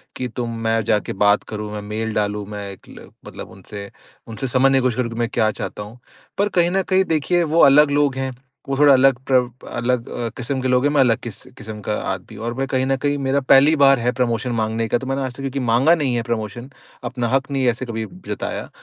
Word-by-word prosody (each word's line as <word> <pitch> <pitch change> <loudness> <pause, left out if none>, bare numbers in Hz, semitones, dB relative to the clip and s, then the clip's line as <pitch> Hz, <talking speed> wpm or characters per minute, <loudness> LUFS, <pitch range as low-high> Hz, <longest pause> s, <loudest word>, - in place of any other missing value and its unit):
कि 125 - -3
तुम" 115 -1 -5
मैं 115 0 +1
जा 105 - +3
के - - -6
बात 100 +1 +3
करूँ, 105 0 -5
मैं 105 - -5
मेल 110 +1 -4
डालूँ, 105 -1 -1
मैं 105 -1 -6
एक 95 - -14
ल - - -13 0.2
मतलब - - -9
उनसे, 100 -1 -9 0.4
उनसे 120 +4 -4
समझने 135 +2 +3
की - - +3
कोशिश 125 -1 0
करूँ 120 -2 -1
कि - - -7
मैं 120 0 0
क्या 110 -2 +2
चाहता 105 - -6
हूँ। 115 +4 -12 0.4
पर 205 +1 +1
कहीं 170 +1 +3
न 195 0 +2
कहीं 190 0 +4
देखिए, 165 +3 +1
वो 165 +1 +1
अलग 145 +1 +6
लोग 145 -2 +2
हैं, 130 0 -3 0.4
वो 135 - -1
थोड़ा 145 -1 +6
अलग 130 -1 +4
प्रव 125 -2 +2 0.2
अलग 125 -1 -2
अ, 120 - -3
किस्म 130 +2 -2
के 130 - -1
लोग 125 +1 +2
हैं, 145 - +3
मैं 140 - +4
अलग 120 -3 +3
किस 115 -3 -8 0.2
किस्म 110 -1 -8
का 105 - -2 0.2
आदमी 95 - -9
हूँ। 115 - -6
और 120 - -2
मैं 135 +2 -2
कहीं 130 -1 0
न 135 0 +1
कहीं 145 0 +1
मेरा 135 0 0
पहली 145 +4 +6
बार 135 -2 +6
है 120 +1 +1
प्रमोशन 120 0 0
माँगने 110 +1 -1
का, 120 - +1
तो 130 - -7
मैंने 135 +1 -1
आज 130 -2 -3
तक - - -14
क्योंकि 135 0 -3
माँगा 135 +9 +5
नहीं 135 -6 -1
है 120 - 0
प्रमोशन, 120 +2 -4 0.3
अपना 120 -2 -2
हक़ 135 +1 0
नहीं 135 -2 0
ऐसे 120 +2 0
कभी 110 -1 -4
ब 180 +7 -14
जताया। - - -4
125 Hz, 250 wpm, -20 LUFS, 115-135 Hz, 0.4 s, अलग